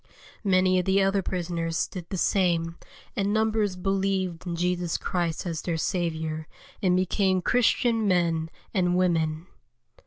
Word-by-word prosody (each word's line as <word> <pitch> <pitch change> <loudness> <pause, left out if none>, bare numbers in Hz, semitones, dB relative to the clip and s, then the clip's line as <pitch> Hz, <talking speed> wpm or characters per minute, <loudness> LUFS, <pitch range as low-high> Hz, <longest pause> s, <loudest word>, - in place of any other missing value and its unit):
Many 185 -2 +3
of 180 - -1
the 195 0 +3
other 195 0 +2
prisoners 170 -3 -2
did 175 -2 -8
the 190 - -3
same, 170 -3 +1 0.4
and 200 0 0
numbers 220 -2 +1
believed 190 -2 -1
in 170 - -2
Jesus 175 0 0
Christ 170 -2 -2
as 165 -2 -3
their 170 -2 -2
Saviour, 160 -2 -2 0.3
and 180 -2 +3
became 185 0 +1
Christian 230 -1 +2
men 165 -3 +1 0.2
and 180 -3 +2
we 185 0 +4
men. 160 -1 -1
180 Hz, 145 wpm, -26 LUFS, 170-195 Hz, 0.4 s, we